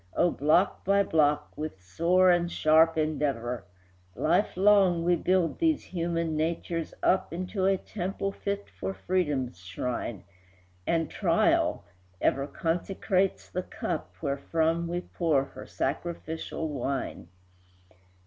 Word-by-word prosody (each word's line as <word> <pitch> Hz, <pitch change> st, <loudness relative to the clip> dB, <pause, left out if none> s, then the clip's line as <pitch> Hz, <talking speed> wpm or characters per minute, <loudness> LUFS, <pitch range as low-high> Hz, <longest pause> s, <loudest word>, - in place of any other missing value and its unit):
O, 175 Hz, -, +3 dB
block 155 Hz, +7 st, +2 dB
by 200 Hz, +1 st, +3 dB
block, 150 Hz, -4 st, +1 dB
with 155 Hz, -10 st, -5 dB
sore 170 Hz, -, +3 dB
and 175 Hz, 0 st, +1 dB
sharp 160 Hz, +1 st, +4 dB
endeavor, 140 Hz, -6 st, -1 dB, 0.5 s
Lifelong 190 Hz, 0 st, +3 dB
we 175 Hz, +1 st, +3 dB
build 180 Hz, 0 st, +1 dB
these 320 Hz, -2 st, +2 dB
human 170 Hz, -2 st, -2 dB
natures 165 Hz, +1 st, -2 dB
up 190 Hz, -, +2 dB
Into 185 Hz, +3 st, -1 dB
a 195 Hz, 0 st, +3 dB
temple 195 Hz, +1 st, -3 dB
fit 200 Hz, 0 st, -4 dB
for 195 Hz, -, -5 dB
freedom's 145 Hz, -, -1 dB
shrine, 100 Hz, +4 st, -4 dB, 0.6 s
And 165 Hz, -2 st, +1 dB
Trial -, -, +2 dB, 0.3 s
ever 140 Hz, +1 st, +1 dB
consecrates 185 Hz, +5 st, -1 dB
the 185 Hz, -, -3 dB
cup -, -, -5 dB
Wherefrom 160 Hz, +4 st, 0 dB
we 175 Hz, +1 st, -2 dB
pour 160 Hz, -7 st, +1 dB
her -, -, -11 dB
sacrificial 160 Hz, +2 st, -3 dB
wine. 135 Hz, -, -3 dB
165 Hz, 115 wpm, -28 LUFS, 150-185 Hz, 0.6 s, sharp